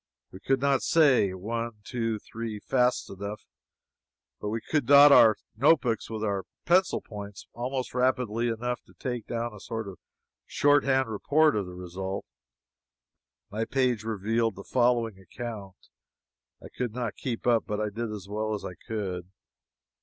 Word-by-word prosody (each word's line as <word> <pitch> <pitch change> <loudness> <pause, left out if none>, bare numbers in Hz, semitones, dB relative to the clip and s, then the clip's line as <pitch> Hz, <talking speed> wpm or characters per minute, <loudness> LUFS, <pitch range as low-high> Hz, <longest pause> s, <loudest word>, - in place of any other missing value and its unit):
We 95 - -10
could 135 +6 +1
not 140 0 +2
say 140 - +4
one, 115 +5 -3
two, 115 -1 -2
three, 110 +1 -6
fast 125 +2 +1
enough, 100 +2 -6 0.9
but 105 - -3
we 115 +2 -2
could 145 +2 -1
dot 145 +1 +9
our 115 -5 +8 0.2
notebooks 125 -2 +2
with 110 -1 -4
our 100 -3 -1 0.2
pencil 185 +2 +3
points 100 -2 -9
almost 130 +2 -3
rapidly 125 -2 +1
enough 120 +2 -2
to - - -21
take 120 -4 -4
down 120 -1 -3
a 105 - -11
sort 110 +1 -5
of 95 -3 -9 0.5
short 145 0 +4
hand 135 -1 +2
report 150 +8 +2
of 100 -3 -1
the 90 - -9
result. 95 +2 -5 1.3
My 110 +2 -1
page 125 -3 0
revealed 110 0 0
the 100 - -9
following 120 -4 +1
account. 100 -1 -7 0.9
I - - -9
could 120 -3 -3
not 120 -4 -2
keep 120 -3 -4
up, 120 -2 +3
but 105 -1 -2
I 105 -1 -1
did 115 +1 -4
as 100 -3 -7
well 110 +1 -2
as 105 - -7
I - - -5
could. 95 -2 -5
115 Hz, 160 wpm, -28 LUFS, 105-125 Hz, 1.3 s, dot